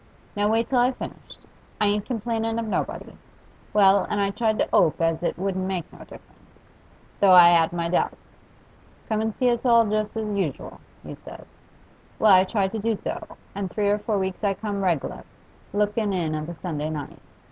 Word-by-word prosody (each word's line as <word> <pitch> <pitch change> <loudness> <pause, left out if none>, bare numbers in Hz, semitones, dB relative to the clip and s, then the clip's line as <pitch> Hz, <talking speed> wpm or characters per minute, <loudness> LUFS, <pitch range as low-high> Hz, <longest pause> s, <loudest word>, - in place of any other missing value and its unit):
Now 205 +1 +1
wait 225 +1 +2
till 255 0 +1
I've 250 +1 +2
finished; - - -10 0.3
I 210 - +2
ain't 205 0 0
complainin' 225 -1 -2
of 230 - -2
nobody. 215 - -4 0.6
Well, 200 -1 +4
and 205 - -1
I 200 0 +1
tried 220 0 0
to - - +1
'ope 160 - +3
as 165 -1 0
it 175 - -2
wouldn't 190 0 -2
make 185 -4 -4
no - - -14
difference, - - -17 0.5
though 195 -2 +6
I 175 -1 +9
'ad 165 -1 +3
my 170 -1 -2
doubts. 175 - -3 0.7
"Come 220 -2 0
an' 220 0 -1
see 250 +3 +1
us 235 - -2
all 235 -2 +5
just 215 +1 -2
as 220 - -2
usu'l," 175 -9 -4 0.3
you - - -7
said. - - -12 0.7
Well, 215 - +4
I 185 0 +6
tried 195 -1 -1
to 225 - -4
do 225 +1 0
so, - - -7 0.2
and 195 -1 -4
three 205 +2 0
or 205 +1 +1
four 210 0 -1
weeks 190 +1 -3
I 200 -1 +1
come 205 -2 -4
reg'lar, 170 -7 -1 0.5
lookin' 210 0 0
in 165 -4 -1
of 155 +1 -4
a 175 - -7
Sunday 155 -3 -4
night. 150 -3 -6
200 Hz, 195 wpm, -24 LUFS, 180-220 Hz, 0.7 s, I